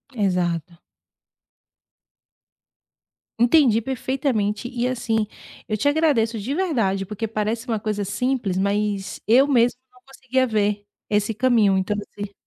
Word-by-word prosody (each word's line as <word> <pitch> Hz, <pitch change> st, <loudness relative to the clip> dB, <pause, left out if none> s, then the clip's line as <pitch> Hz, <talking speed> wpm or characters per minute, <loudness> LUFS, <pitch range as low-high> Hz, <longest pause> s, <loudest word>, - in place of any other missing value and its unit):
Exato. 180 Hz, -4 st, -1 dB, 2.6 s
Entendi 240 Hz, -2 st, +4 dB
perfeitamente, 245 Hz, -4 st, -1 dB
e 245 Hz, 0 st, -2 dB
assim, 225 Hz, -4 st, -1 dB, 0.4 s
eu 215 Hz, -, -1 dB
te 250 Hz, -, 0 dB
agradeço 285 Hz, -7 st, +2 dB
de 235 Hz, +7 st, -3 dB
verdade, 230 Hz, -, 0 dB
porque 215 Hz, +3 st, -4 dB
parece 220 Hz, +3 st, -2 dB
uma 225 Hz, -3 st, -1 dB
coisa 210 Hz, -1 st, -2 dB
simples, 210 Hz, -1 st, -1 dB
mas 200 Hz, 0 st, -1 dB
eu 255 Hz, +6 st, +5 dB
mesmo 245 Hz, -3 st, +3 dB
não 250 Hz, -, -23 dB
conseguia 265 Hz, -1 st, -1 dB
ver 210 Hz, -3 st, 0 dB, 0.2 s
esse 210 Hz, +1 st, +1 dB
caminho, 220 Hz, -4 st, +3 dB
então 190 Hz, +2 st, -1 dB
você 205 Hz, 0 st, -7 dB
220 Hz, 120 wpm, -22 LUFS, 205-250 Hz, 2.6 s, eu